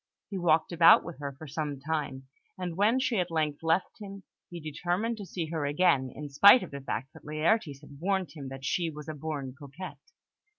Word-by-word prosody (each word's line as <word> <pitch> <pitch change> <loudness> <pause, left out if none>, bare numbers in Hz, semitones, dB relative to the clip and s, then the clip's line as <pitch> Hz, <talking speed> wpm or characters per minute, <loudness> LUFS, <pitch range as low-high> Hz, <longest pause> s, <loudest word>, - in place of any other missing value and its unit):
He 195 - -3
walked 160 -2 +2
about 170 -1 +7
with 170 -3 -9
her 140 -1 -5
for 155 - -9
some 145 -1 -4
time; 140 -3 -3 0.3
and 180 -2 -4
when 210 +6 +3
she 255 -5 +1
at 180 -1 0
length 155 -3 -1
left 165 +6 0
him, 200 -2 -9 0.3
he 175 - -7
determined 175 +9 -2
to 200 -3 -8
see 165 -4 -4
her 160 -3 -2
again, 145 -3 +3
in 150 +1 -6
spite 200 - +8
of - - -9
the 140 0 -6
fact 130 -1 -4
that - - -14
Laertes 155 -1 0
had 145 -2 -14
warned 190 -2 0
him 140 -2 -8
that 135 0 -8
she 170 +4 0
was 150 -2 -9
a 155 - -4
born 145 -3 -5
coquette. 145 +6 -9
160 Hz, 210 wpm, -29 LUFS, 145-180 Hz, 0.3 s, spite